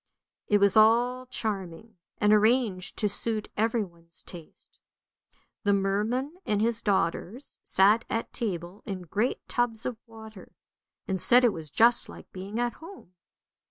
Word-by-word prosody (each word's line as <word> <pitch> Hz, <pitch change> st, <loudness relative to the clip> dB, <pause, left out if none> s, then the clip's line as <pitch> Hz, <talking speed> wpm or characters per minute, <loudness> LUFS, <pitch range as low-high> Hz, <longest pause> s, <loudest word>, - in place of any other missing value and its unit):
It 210 Hz, -, +4 dB
was 200 Hz, 0 st, +3 dB
all 240 Hz, +4 st, +4 dB
charming, 205 Hz, -3 st, -5 dB, 0.2 s
and 210 Hz, 0 st, +3 dB
arranged 215 Hz, -4 st, +2 dB
to 210 Hz, -, +1 dB
suit 215 Hz, +1 st, -3 dB
everyone's 185 Hz, -7 st, -3 dB
taste. 170 Hz, -3 st, -14 dB, 0.8 s
The 205 Hz, -2 st, +3 dB
merman 215 Hz, -, -1 dB
and 210 Hz, -1 st, 0 dB
his 230 Hz, +1 st, 0 dB
daughters 200 Hz, +5 st, -2 dB
sat 205 Hz, +4 st, +4 dB
at 225 Hz, -, -3 dB
table 180 Hz, -3 st, -4 dB
in 190 Hz, -3 st, -5 dB
great 205 Hz, +9 st, -2 dB
tubs 240 Hz, -2 st, -1 dB
of 245 Hz, -3 st, -3 dB
water, 220 Hz, -3 st, -13 dB, 0.5 s
and 190 Hz, -3 st, -1 dB
said 245 Hz, +1 st, +6 dB
it 235 Hz, -4 st, +4 dB
was 160 Hz, -2 st, -7 dB
just 230 Hz, -, +3 dB
like -, -, -12 dB
being 195 Hz, +4 st, -6 dB
at 240 Hz, 0 st, 0 dB
home. 330 Hz, -, -12 dB
215 Hz, 140 wpm, -27 LUFS, 190-235 Hz, 0.8 s, said